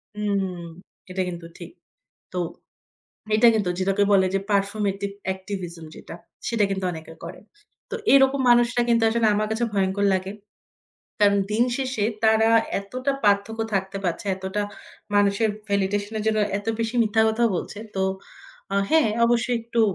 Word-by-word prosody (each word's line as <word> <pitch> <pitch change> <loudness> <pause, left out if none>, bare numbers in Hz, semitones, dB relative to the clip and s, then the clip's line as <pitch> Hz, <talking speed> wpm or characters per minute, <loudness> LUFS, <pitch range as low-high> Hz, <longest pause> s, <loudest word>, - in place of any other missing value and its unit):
হুম। 195 -4 -2 0.5
এটা 190 0 -2
কিন্তু 170 -1 -7
ঠিক। - - -10 0.6
তো 180 - -3 1.0
এইটা 230 +2 +6
কিন্তু 205 -5 0
যেটাকে 195 +2 +2
বলে 190 -1 +5
যে, 195 - +2
performative 200 0 -1 0.2
activism 185 -4 -7
যেটা, - - -10 0.3
সেটা 230 -3 +1
কিন্তু 190 -1 -2
অনেকে 160 -1 -9
করে। 170 +2 -8 0.5
তো - - -3 0.2
এরকম 270 0 +5
মানুষরা 240 0 +4
কিন্তু 230 -1 +3
আসলে 230 0 +2
আমার 215 0 0
কাছে 225 +2 -1
ভয়ংকর 195 +1 +1
লাগে। 190 0 -2 0.9
কারণ 200 -1 +4
দিন 220 +3 +3
শেষে 255 -6 -2 0.2
তারা 220 0 +4 0.3
এতটা 255 +7 -3
পার্থক্য 205 +2 +1
থাকতে 195 +1 -1
পারছে। 175 +3 -2
এতটা 190 +2 -3 0.5
মানুষের 205 +2 +3 0.2
ভ্যালিডেশন 200 +1 -1
এর 215 - -3
জন্য 220 0 +2 0.2
এত 205 - -11
বেশি 225 +1 -2
মিথ্যা 220 0 +2
কথা 220 +2 +1
বলছে। 205 - -6 0.2
তো 190 - 0 0.7
আ - - +2
হ্যাঁ 315 -7 +4 0.2
অবশ্যই 240 +1 +2
একটু 230 0 -1
205 Hz, 145 wpm, -24 LUFS, 190-225 Hz, 1.0 s, এইটা